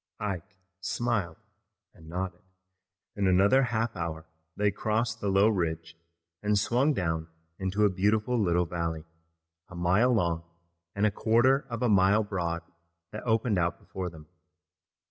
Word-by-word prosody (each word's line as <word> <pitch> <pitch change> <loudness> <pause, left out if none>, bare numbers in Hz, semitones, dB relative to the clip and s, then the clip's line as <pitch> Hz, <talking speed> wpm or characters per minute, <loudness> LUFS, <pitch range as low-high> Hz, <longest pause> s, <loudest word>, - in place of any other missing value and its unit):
Ike 100 -1 -4 0.2
smiled 105 -1 -1 0.6
and 80 -1 -15
nodded. 90 +1 -4 0.7
In 100 -2 +1
another 100 +8 +5
half 115 -1 -1
hour 80 -2 -4 0.3
they 105 0 +2
crossed 110 +3 -1
the 105 - -2
low 100 +2 +5
ridge 85 -5 -1 0.5
and 105 0 +2
swung 125 +8 +2
down 80 -4 -1 0.3
into 95 +2 +1
a - - +5
beautiful 105 +6 +1
little 90 -2 +2
valley, 85 -2 -3 0.6
a 90 - -10
mile 95 +8 +3
long 85 -7 +1 0.5
and 100 +2 +2
a 105 - +3
quarter 120 +6 +3
of 115 0 -3
a - - +3
mile 100 +1 +4
broad 85 -5 -3 0.5
that 105 - -6
opened 110 -3 +2
out 85 -1 0
before 90 0 -6
them. 80 -2 -13
100 Hz, 145 wpm, -28 LUFS, 85-110 Hz, 0.7 s, another